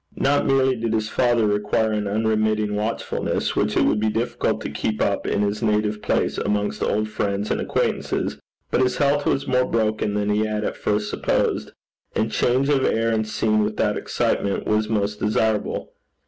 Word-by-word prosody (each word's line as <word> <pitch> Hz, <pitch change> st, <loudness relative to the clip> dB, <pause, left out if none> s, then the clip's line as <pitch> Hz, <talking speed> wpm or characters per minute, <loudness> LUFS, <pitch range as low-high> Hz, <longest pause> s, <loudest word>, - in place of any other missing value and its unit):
Not 145 Hz, +1 st, +2 dB
merely 135 Hz, -1 st, +3 dB
did 115 Hz, -1 st, -2 dB
his 110 Hz, -1 st, 0 dB
father 120 Hz, -3 st, +2 dB
require 105 Hz, +1 st, +1 dB
an 105 Hz, -1 st, -1 dB
unremitting 110 Hz, 0 st, +1 dB
watchfulness, 110 Hz, +2 st, -2 dB
which -, -, +1 dB
it -, -, +4 dB
would 105 Hz, -, +2 dB
be 110 Hz, 0 st, +1 dB
difficult 115 Hz, +3 st, -1 dB
to -, -, -5 dB
keep 110 Hz, -1 st, -2 dB
up 100 Hz, -1 st, 0 dB
in 100 Hz, -, +1 dB
his 105 Hz, +1 st, -1 dB
native 105 Hz, -1 st, 0 dB
place -, -, 0 dB
amongst 105 Hz, 0 st, -1 dB
old 110 Hz, +1 st, 0 dB
friends 100 Hz, -1 st, -2 dB
and -, -, 0 dB
acquaintances, -, -, -1 dB, 0.3 s
but -, -, +2 dB
his 130 Hz, -1 st, +1 dB
health 145 Hz, 0 st, +2 dB
was 135 Hz, -, +1 dB
more 125 Hz, 0 st, +2 dB
broken 110 Hz, -3 st, 0 dB
than 105 Hz, 0 st, 0 dB
he 105 Hz, +1 st, +2 dB
had 105 Hz, 0 st, -2 dB
at -, -, -2 dB
first 105 Hz, 0 st, -1 dB
supposed, -, -, 0 dB, 0.4 s
and 110 Hz, 0 st, 0 dB
change 125 Hz, +5 st, +2 dB
of 140 Hz, -2 st, +2 dB
air 115 Hz, +1 st, +1 dB
and 110 Hz, -1 st, 0 dB
scene 110 Hz, 0 st, +1 dB
without 105 Hz, 0 st, 0 dB
excitement 100 Hz, -1 st, -1 dB
was 105 Hz, 0 st, +1 dB
most 105 Hz, -1 st, -1 dB
desirable. 105 Hz, 0 st, 0 dB
110 Hz, 180 wpm, -23 LUFS, 105-115 Hz, 0.4 s, it